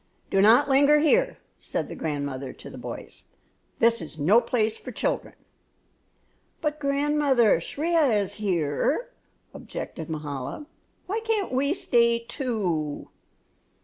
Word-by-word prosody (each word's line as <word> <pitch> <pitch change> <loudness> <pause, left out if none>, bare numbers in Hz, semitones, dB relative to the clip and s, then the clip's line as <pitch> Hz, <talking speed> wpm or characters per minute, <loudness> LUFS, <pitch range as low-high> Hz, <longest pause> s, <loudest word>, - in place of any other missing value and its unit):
"Do 195 - +3
not 230 +8 +6
linger 285 +2 +5
here," 480 +12 +3 0.2
said - - -3
the - - -7
grandmother 140 -4 -4
to - - -12
the - - -10
boys, - - -8 0.5
"this 230 -2 +3
is 155 -1 -9
no 190 +11 +4
place 220 -3 0
for - - -9
children." - - -2 1.2
"But, 300 0 -2
grandmother, 280 - +2
Shriya 310 - +1
is 200 -2 -3
here," 190 - 0 0.4
objected 170 - -7
Mahala; 150 - -5 0.4
"why 420 +4 -2
can't 445 -4 -1
we 280 +5 +1
stay, 235 -7 +3
too." 215 - -3
235 Hz, 120 wpm, -26 LUFS, -, 1.2 s, not